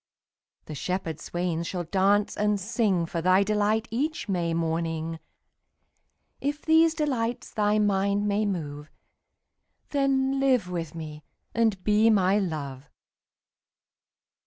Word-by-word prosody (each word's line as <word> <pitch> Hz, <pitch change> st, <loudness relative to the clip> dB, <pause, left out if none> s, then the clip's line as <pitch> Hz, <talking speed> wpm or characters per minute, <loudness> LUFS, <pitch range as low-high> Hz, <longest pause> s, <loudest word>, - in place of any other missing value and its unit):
20 -, -, -43 dB
The 155 Hz, -, -6 dB
shepherd 165 Hz, 0 st, -3 dB
swains 175 Hz, -1 st, -3 dB
shall 180 Hz, -2 st, -3 dB
dance 195 Hz, +4 st, +2 dB
and 210 Hz, -1 st, +1 dB
sing 200 Hz, -4 st, 0 dB
For 170 Hz, 0 st, -3 dB
thy 185 Hz, +3 st, +4 dB
delight 215 Hz, +2 st, +1 dB
each 300 Hz, +7 st, -2 dB
May 175 Hz, -4 st, 0 dB
morning: 165 Hz, 0 st, -2 dB, 1.2 s
If 290 Hz, +2 st, -3 dB
these 320 Hz, 0 st, +5 dB
delights 250 Hz, -7 st, -2 dB
thy 210 Hz, 0 st, +2 dB
mind 200 Hz, 0 st, +1 dB
may 205 Hz, +1 st, +1 dB
move, 150 Hz, -5 st, -4 dB, 1.0 s
Then 275 Hz, -1 st, +1 dB
live 255 Hz, -9 st, +2 dB
with 165 Hz, -3 st, -4 dB
me 155 Hz, -2 st, -8 dB, 0.3 s
and 220 Hz, -5 st, +1 dB
be 215 Hz, +2 st, +4 dB
my 200 Hz, -1 st, +3 dB
Love. 145 Hz, -7 st, -4 dB
200 Hz, 120 wpm, -26 LUFS, 170-225 Hz, 1.2 s, these